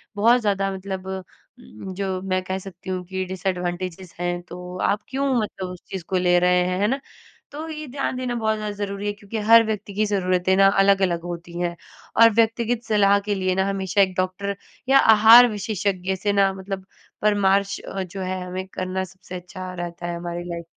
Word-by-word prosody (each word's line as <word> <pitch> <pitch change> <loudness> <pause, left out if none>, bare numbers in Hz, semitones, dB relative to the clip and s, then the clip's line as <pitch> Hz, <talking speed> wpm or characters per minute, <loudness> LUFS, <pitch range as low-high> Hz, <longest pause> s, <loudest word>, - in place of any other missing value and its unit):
बहुत 235 +4 +4
ज़्यादा 195 -2 0
मतलब 190 0 -6
उम, 190 +1 -9
जो 190 -1 -3
मैं 185 -1 -1
कह 190 +1 -3
सकती 190 -1 -10
हूँ 185 -1 -2
कि 190 +1 -3
डिसएडवांटेज़ेस 180 -1 -4
हैं 175 0 -2
तो 180 +1 -9
आप 205 - +1
क्यों 270 +1 0
मतलब 190 -3 -5
उस 180 -1 -9
चीज़ 190 -3 -5
को 190 - 0
ले 180 -1 +3
रहे 180 0 +3
हैं, 180 0 -1
है 205 - +2
ना? 270 +4 0 0.5
तो 310 +3 -6
ये 310 -1 -6
ध्यान 270 0 -3
देना 250 -1 -2
बहुत 220 -2 0
ज़्यादा 210 -1 -4
ज़रूरी 200 0 -4
है - - +1
क्योंकि 205 +2 -7
हर 230 0 +8
व्यक्ति 210 -2 -4
की 215 +2 +1
जरूरतें 185 -2 +1
ना 195 0 +7
अलग-अलग 195 -3 +3
होती 175 0 -7
हैं 175 -1 -1 0.5
और 230 - +10
व्यक्तिगत 230 +1 +1
सलाह 200 -2 +4
के 205 -1 0
लिए 185 -1 0
ना 190 0 +1
हमेशा 195 0 +1
एक 190 -1 +2
डॉक्टर 185 +2 -1 0.3
या 275 - +7
आहार 225 +2 +8
विशेषज्ञ 195 -2 -2
से 205 +2 -1
ना 195 -1 +4
मतलब 190 0 -6 0.4
परामर्श 200 -1 +2
जो 190 0 -5
है 185 0 -3
हमें 185 +1 -5
करना 185 0 -3
सबसे 185 0 -11
अच्छा 185 +1 -7
रहता 175 -1 -6
है 175 - -3
हमारी 175 0 -5
लाइफ 170 -1 -5
190 Hz, 195 wpm, -23 LUFS, 185-205 Hz, 0.5 s, और